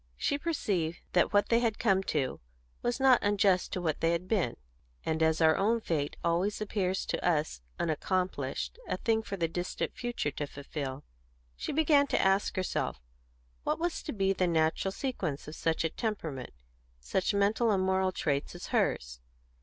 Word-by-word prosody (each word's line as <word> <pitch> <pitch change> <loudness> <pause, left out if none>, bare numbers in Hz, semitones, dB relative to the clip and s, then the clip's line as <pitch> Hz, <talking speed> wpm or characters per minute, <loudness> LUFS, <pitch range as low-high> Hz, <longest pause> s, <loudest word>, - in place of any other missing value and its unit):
She 285 - 0
perceived 190 - -1
that 175 - +3
what 205 -1 +3
they 230 - +5
had 230 -3 0
come 190 -1 +3
to 135 -4 -1 0.4
was 240 +2 -1
not 265 -2 +6
unjust 200 -3 +2
to 180 - -2
what 160 -3 -1
they 165 +1 +3
had 170 +2 -2
been; 185 - 0 0.5
and 160 0 0
as 160 0 +3
our 160 -1 +6
own 225 +4 +2
fate 155 -8 -2
always 175 +5 +1
appears 195 -3 -1
to - - -2
us 155 - +1 0.2
unaccomplished, 180 - -1
a - - -1
thing 225 -2 +1
for 200 -3 -5
the 170 -2 +1
distant 175 +2 -3
future 240 -11 -2
to 145 +1 -4
fulfil, 140 -1 -5 0.5
she - - -4
began 290 -1 +4
to - - +1
ask 195 +1 +2
herself 185 - -1 0.6
what - - 0
was 345 +1 -1
to 305 - -5
be 195 -4 +1
the 185 -1 +1
natural 160 +3 +1
sequence 190 - -3
of 150 - -7
such 160 0 0
a 165 - +1
temperament, 165 - -4 0.5
such 185 - 0
mental 210 +4 +3
and 195 -3 +2
moral 190 0 +2
traits, 145 -6 -1
as - - -8
hers. - - 0
185 Hz, 175 wpm, -30 LUFS, 160-210 Hz, 0.6 s, not